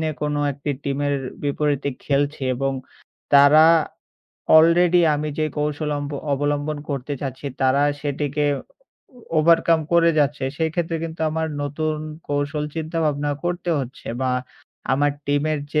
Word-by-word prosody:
নিয়ে 155 -1 -1
কোনো 150 0 -1
একটি 140 +2 -4
টিমের 145 +1 0 0.3
বিপরীতে 145 -1 0 0.2
খেলছি 145 0 0
এবং 135 +2 -1 0.6
তারা 145 +2 +7 1.0
অলরেডি 170 +2 +5 0.2
আমি 150 +1 -2
যে 155 - +2
কৌশল 150 0 -1
অম্ব 145 0 -5 0.2
অবলম্বন 145 +1 -1
করতে 140 +1 -3
চাচ্ছি 135 0 -5
তারা 135 +1 +3 0.2
সেটিকে 145 +1 -2 0.2
ও - - -10 0.8
ওভারকাম 165 0 +4
করে 170 0 +5
যাচ্ছে। 145 -1 +1
সেক্ষেত্রে 165 +1 -1
কিন্তু 160 0 -7
আমার 160 +1 -1 0.2
নতুন 155 +2 -2 0.3
কৌশল 145 +1 -1
চিন্তাভাবনা 155 -3 -1
করতে 175 0 -2
হচ্ছে। 130 0 -8
বা 130 - 0 0.6
আমার 145 +2 +2 0.2
টিমের 145 +1 +1 0.2
যে 150 - +4
150 Hz, 130 wpm, -22 LUFS, 145-160 Hz, 1.0 s, তারা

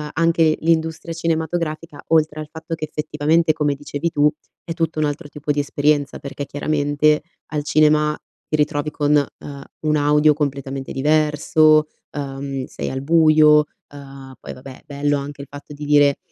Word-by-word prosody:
anche 165 -1 +3
l'industria 160 0 0
cinematografica 165 -1 -3
oltre 155 -1 +2
al 155 - -6
fatto 160 +1 -7
che 155 -1 -4
effettivamente, 155 +1 +1
come 150 -2 0
dicevi 145 +3 -4
tu, 150 -1 +3 0.3
è 165 - -5
tutto 165 -1 -2
un 155 - +2
altro 145 +2 -4
tipo 150 0 -4
di 145 - 0
esperienza 145 0 0
perché, 140 0 -6
chiaramente, 145 +1 +1 0.3
al 150 -1 -3
cinema 150 0 +3 0.3
ti - - -1
ritrovi 150 0 0
con, 150 0 +1
ehm, 140 0 -5 0.2
un 155 -1 +1
audio 150 +1 +4
completamente 140 -2 -4
diverso, 155 +1 +3 0.3
ehm, 135 -1 -5
sei - - -6
al 130 0 -4
buio. 155 -1 +5 0.3
Uhm, 135 -2 -11
poi - - -8
vabbè, 130 0 -12
bello 145 0 -1
anche 140 0 -7
il 140 - -10
fatto 145 +1 -11
di 145 - -9
dire: 145 -1 +4
150 Hz, 160 wpm, -20 LUFS, 145-155 Hz, 0.3 s, buio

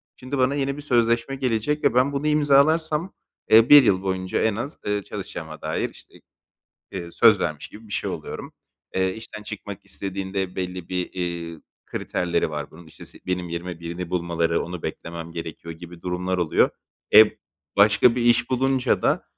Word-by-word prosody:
şimdi 130 +2 -5
bana 130 +2 +2
yeni 140 0 -1
bir - - -6
sözleşme 120 -1 +1
gelecek 130 +3 -1
ve 140 - +3
ben 130 +3 +3
bunu 140 +2 -1
imzalarsam, 150 +3 +3 0.4
eee, 115 +1 +7
1 145 -1 +10
yıl 95 -5 +3
boyunca 95 -1 -1
en 110 -2 +1
az, 125 +7 -3
eee, 105 -1 -1
çalışacağıma - - -7
dair - - -2
işte, - - -18 0.8
eee, 85 -3 -6
söz 110 +2 +5
vermiş 75 -4 -3
gibi 110 +1 -14
bir - - -10
şey - - -2
oluyorum. - - -7 0.4
Eee, 95 0 +1
işten 110 -1 -9
çıkmak 105 -2 -7
istediğinde 95 -1 -3
belli 90 -1 -4
bir, 90 -1 -2
eee, 85 -3 -4 0.3
kriterleri 85 -3 -1
var 75 -1 -5
bunun. 80 +1 -14
İşte 80 0 -13
si - - -10
benim 90 -1 -2
yerime 85 0 -5
birini 85 +1 -6
bulmaları, 85 -2 0
onu 90 0 -7
beklemem 85 0 -6
gerekiyor 85 0 -7
gibi 85 +1 -12
durumlar 90 +1 -2
oluyor. 85 -3 +3 0.4
E, 110 - +11 0.5
başka 105 +4 +5
bir 125 - 0
iş 120 +1 +3
bulunca 130 0 +1
da, - - +1
95 Hz, 170 wpm, -24 LUFS, 85-125 Hz, 0.8 s, E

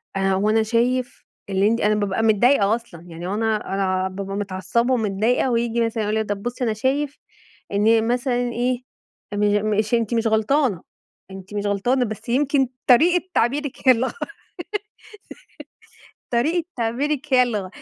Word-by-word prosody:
آآ 195 0 +1
هو 195 +3 +1
أنا 220 +1 +3
شايف 245 +3 -1 0.2
اللي 195 +1 +2
أنتِ" 230 +2 +1
أنا 210 +1 +3
بابقى 205 +1 -1
متضايقة 220 0 +4
أصلًا. 230 -8 -10
يعني 170 +1 -7
هو 190 - -2
أنا 215 -2 -1
أنا 195 0 0
ع 185 0 0
بابقى 195 +1 -6
متعصّبة 200 +5 -1
ومتضايقة 225 +3 +1
وييجي 235 0 0
مثلًا 225 -1 -2
يقول 210 +1 -1
لي - - +1
إيه: 215 - -5
"طب 200 -1 -3
بُصّي 245 +1 -3
أنا 225 -3 +1
شايف 275 +6 -1 0.5
إن 220 +2 +3
مثلًا 245 0 0
إيه، 245 +1 -1 0.5
إن 205 0 +1
مش 215 +2 0
أنتِ 230 -1 +1
مش 230 -1 +1
غلطانة، 220 - +1 0.5
أنتِ 190 +1 -10
مش 205 0 -2
غلطانة، 240 +6 +1
بس 220 +1 -7
يمكن 270 +1 +2 0.2
طريقة 345 +8 +5
تعبيرِك 275 +3 -1
هي - - +10
اللي 250 +1 +2
غ - - -4 2.2
طريقة 310 +9 +1
تعبيرِك 270 +5 -1
هي 250 - +7
اللي 240 -4 0
غ 185 - -7
225 Hz, 170 wpm, -22 LUFS, 205-250 Hz, 2.2 s, هي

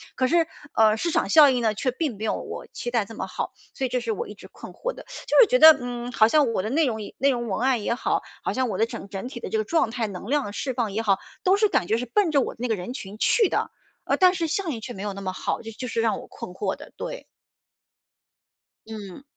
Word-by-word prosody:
可 260 - +2
是， 330 +2 +3 0.3
呃， 220 -1 +4
市 335 +9 -1
场 - - +1
效 300 -3 +8
应 250 -2 +1
呢， 220 -2 +2
却 255 +5 -1
并 255 -5 -3
没 220 - -4
有 - - +1
我 - - -7
期 240 - -4
待 230 -4 +1
这 225 - -11
么 - - -3
好。 - - -4 0.2
所 265 - -2
以 - - -2
这 250 0 -1
是 450 - -2
我 465 +2 -3
一 - - -8
直 - - -13
困 - - -11
惑 - - -3
的。 - - -11 0.2
就 - - +4
是 - - +9
觉 250 - +4
得， 315 +1 +10
嗯， 245 0 -5
好 220 -2 +5
像 280 0 +3
我 190 - 0
的 215 - -3
内 305 +6 +2
容 235 -5 -1 0.2
内 275 - +3
容 240 -3 -1
文 200 - -2
案 255 -4 +2
也 235 - +1
好， 245 - 0 0.2
好 - - -1
像 260 -1 0
我 195 - -3
的 220 - +3
整 230 -3 -8
整 195 +3 -5
体 250 - -8
的 - - -6
这 220 - 0
个 215 - +1
状 320 +2 +1
态 230 -2 -2
能 195 +1 -8
量 290 0 +2
的 205 - -5
释 260 +5 -3
放 235 -4 -1
也 215 +3 -1
好， 200 -4 +2 0.3
都 375 +1 +5
是 425 0 +3
感 180 - +1
觉 220 - +2
是 250 - -3
奔 365 - +2
着 280 - +4
我 - - -3
那 245 - -1
个 225 - +1
人 190 +6 -6
群 210 -6 -8
去 445 - +4
的， - - -1 0.4
呃， - - +1
但 365 -1 +6
是 335 -2 -1
效 365 +3 -2
应 235 -7 -4
却 245 +1 -6
没 195 - -7
有 205 -1 -3
那 200 - -8
么 185 -1 -2
好， - - -2
这 225 - -8
就 250 +3 -6
是 230 0 -1
让 225 -1 +1
我 - - -10
困 - - -9
惑 - - -2
的， - - -13
对。 - - -6 1.6
嗯。 210 +1 -8
240 Hz, 305 characters per minute, -25 LUFS, 220-290 Hz, 1.6 s, 得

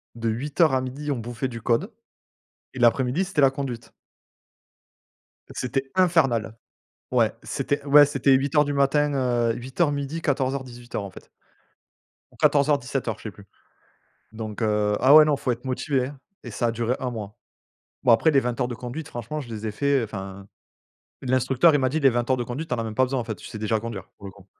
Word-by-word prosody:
de 115 0 -3
8:00 140 +6 +1
à 130 - +2
12:00 135 +4 -6
on 140 - 0
bouffait 120 +3 -4
du 115 -2 -8
code 125 - 0 0.8
et 130 - -7
l'après-midi, 125 +8 +2
c'était 185 -5 -1
la 135 -1 +6
conduite 135 -4 -6 1.6
c'était 135 +2 -3
infernal. 135 - +2 0.6
Ouais, - - +2
c'était, 145 0 -2
ouais, 145 +1 +8
c'était 140 -1 +1
8:00 140 +3 +3
du 145 - -2
matin, 145 +1 +2
heu, 120 -3 +1
8:00-12:00 140 +4 -2
14:00-18:00 130 -6 -3
en - - -7
fait - - -14 1.0
ou - - -22
14:00-17:00 140 -5 +1
je - - -15
sais 110 - -5
plus. 100 +2 -16 0.9
Donc, 110 -1 -7
heu 105 -1 +1
ah 135 +4 +6
ouais, 155 0 +9
non, 150 -2 +2
faut 130 - -1
être 120 +2 -5
motivé, 130 0 -1
hein 140 0 -11 0.2
et 120 - -8
ça 120 - -1
a - - +1
duré 120 +2 -1
1 130 - -2
mois. 105 -3 -7 0.7
Bon, 120 - +5
après, 135 +8 +4
les 140 -3 +4
20 120 -2 -3
heures 125 - +1
de 125 - -4
conduite, 125 +6 -7
franchement, 120 +5 -5
je 130 - -9
les 110 -1 -6
ai 110 - -1
fait. 140 +3 +1
Enfin, 100 -2 -7 0.8
l'instructeur, 130 +4 +3
il - - +4
m'a 130 - +2
dit 155 - -1
les 135 -2 +5
20 120 0 -1
heures 130 - +4
de 120 - -3
conduite, 140 +7 -5
tu 125 - -1
en - - -4
as 115 - -2
même 110 - -5
pas 130 - +3
besoin, 130 +1 -2
en - - -4
fait. 110 -1 -4
Tu - - -12
sais 110 - -8
déjà 110 +1 0
conduire 105 -4 -7
pour 100 - -10
le 95 - -8
coup. 95 -1 -18
130 Hz, 205 wpm, -24 LUFS, 115-140 Hz, 1.6 s, ouais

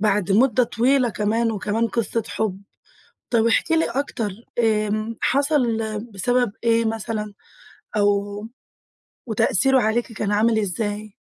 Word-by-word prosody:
بعد 205 -2 +1
مُدة 245 +2 +4
طويلة 250 +2 +2
كمان، 225 +2 0
وكمان 220 +2 -1
قصة 230 0 -1
حُب. 200 -3 -3 0.7
طَب 230 -2 +2
احكي 280 +8 +2
لي 325 - +2
أكتر 235 -4 -2 0.3
آمم 215 0 0
حصل 280 +2 +2 0.5
بسبب 245 +3 +1
إيه 230 0 +3
مثلًا؟ 215 -1 -3 0.6
أو 205 +1 0 0.8
وتأثيره 250 +4 +2
عليكِ 230 +2 0
كان 205 -1 -2
عامل 220 +1 +3
إزاي؟ 205 +1 -3
220 Hz, 115 wpm, -22 LUFS, 205-235 Hz, 0.8 s, مُدة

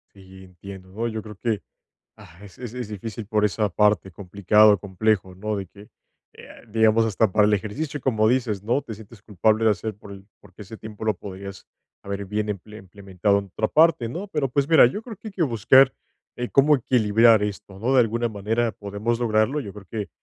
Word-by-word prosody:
Y, 95 0 -15
entiendo, 95 0 -12
¿no? 115 +5 -3
Yo 110 -1 -4
creo 105 -1 -11
que, 110 -1 -2 0.6
ah, 85 +1 -16
es 95 -4 -14
es 125 -2 -6
difícil 105 +1 -7
por 105 -1 +1
esa 105 0 0
parte 105 0 +2
complicado, 100 +3 +3
complejo, 95 -1 -1
¿no? 105 +2 -3
De 95 -1 -5
que, 100 +3 -16 0.5
eh, - - -14 0.2
digamos, 110 +1 +3
hasta 105 -1 +1
para 105 -1 +4
el 105 - +3
ejercicio, 140 +9 -4
como 110 -4 +1
dices, 115 -6 0
¿no? 120 +6 0
Te 115 - -8
sientes 105 0 -15
culpable 110 +2 +1
de 110 - +5
hacer 105 +2 -3
por 100 -1 -12
el 95 0 -13
porque 105 +1 -14
ese 110 +3 -10
tiempo 110 0 -9
lo 110 - +1
podrías 100 0 -9 0.4
haber 100 0 -5
bien 105 +1 -2
imple 105 +2 -8
implementado 100 0 -2
en 100 - -6
otra 105 +3 -3
parte, 155 -7 +3
¿no? 175 - -6
Pero, 150 -7 -1
pues, 140 +3 0
mira, 160 -6 +7
yo 205 - -4
creo 225 -3 -9
que 220 - -9
hay - - -11
que 185 - -2
buscar, 130 +1 +4 0.4
eh, 125 0 -4
cómo 145 +2 +4
equilibrar 115 -2 +3
esto, 100 -1 -5
¿no? 125 +5 0
De 130 - +6
alguna 115 +1 0
manera 110 +2 -1
podemos 105 +3 -3
lograrlo, 120 +4 +1
yo 100 -7 -8
creo 105 -2 -13
que 105 -3 -4
105 Hz, 205 wpm, -23 LUFS, 100-115 Hz, 0.6 s, mira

